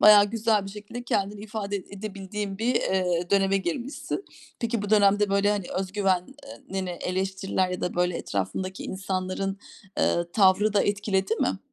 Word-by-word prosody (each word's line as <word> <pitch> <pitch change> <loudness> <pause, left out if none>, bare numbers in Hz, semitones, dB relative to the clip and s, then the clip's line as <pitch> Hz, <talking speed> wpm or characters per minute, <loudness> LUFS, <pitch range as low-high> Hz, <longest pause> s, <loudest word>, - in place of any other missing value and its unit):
bayağı 210 -1 +9
güzel 220 -2 +2
bir 195 - -6
şekilde 210 +4 -7
kendini 205 -3 -1
ifade 205 -1 -3
ed 190 - -7
edebildiğin 200 0 -5
bir, 240 +3 +1
iii, 180 -4 +1
döneme 195 0 +4
girmişsin. 270 - -3 0.4
Peki 230 -3 -1
bu 205 - -4
dönemde, 205 -1 +5
böyle, 200 +1 +3
hani, 205 -3 -1
özgüven 190 -1 0 0.2
eee, - - -11
nini 190 -1 -2
eleştiriler 190 +1 -1
ya 180 - -3
da, 180 - -2
böyle, 180 0 +1
etrafındaki 185 - -3
insanların, 190 0 -2 0.4
ııı, 170 0 +1
tavrı 200 +1 +4
da 205 - +4
etkiledi 200 0 +1
mi? - - 0
195 Hz, 160 wpm, -26 LUFS, 185-210 Hz, 0.4 s, bayağı